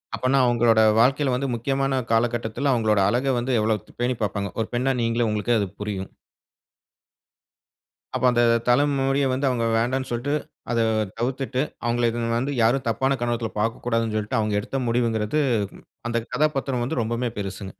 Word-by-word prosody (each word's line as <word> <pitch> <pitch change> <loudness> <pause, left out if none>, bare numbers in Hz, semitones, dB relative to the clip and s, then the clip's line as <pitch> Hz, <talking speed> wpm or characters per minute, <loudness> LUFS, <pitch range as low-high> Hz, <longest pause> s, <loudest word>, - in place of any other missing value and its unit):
அப்பன்னா 130 +2 +2
அவுங்களோட 115 -2 +4 0.2
வாழ்க்கையில 135 +3 +3
வந்து 135 +2 -1
முக்கியமான 135 +2 0
காலகட்டத்தில 120 +3 0
அவுங்களோட 110 -3 +2
அழக 130 +4 +1
வந்து 125 +2 -1
எவ்ளோ 110 0 +1
த் - - -19
பேணி 125 +1 +1
பாப்பாங்க. 100 0 -2
ஒரு 110 - -2
பெண்ணா 130 +2 +1
நீங்களே, 115 0 +1
உங்களுக்கே 105 +3 0
அது 100 - -1
புரியும். 100 -2 -4 2.1
அப்ப 130 - 0
அந்த 120 0 +3 0.2
தல 125 +4 +5 0.2
முடிய 135 +1 +1
வந்து 135 +2 0
அவுங்க 120 -2 0
வேண்டான்னு 130 +3 -1
சொல்ட்டு, 120 +4 -2 0.4
அத 115 - +1 0.4
தவிர்த்திட்டு, 130 +2 -1 0.2
அவுங்கள 120 0 +1
எதும் 115 0 -1
வந்து 135 +4 -1
யாரும் 125 +4 +2
தப்பான 135 +4 +1
கண்ணோட்டத்துல 120 -2 -2
பார்க்கக்கூடாதுனு 115 0 -1
சொல்லிட்டு, 105 +1 -1
அவுங்க 105 -1 0
எடுத்த 135 - -4
முடிவுங்கிறது 115 +3 +1 0.7
அந்த 115 - 0 0.2
கதாபாத்திரம் 135 -5 0
வந்து 130 0 -2
ரொம்பவுமே 115 +1 -2
பெருசுங்க. 95 0 -5
120 Hz, 150 wpm, -24 LUFS, 115-130 Hz, 2.1 s, தல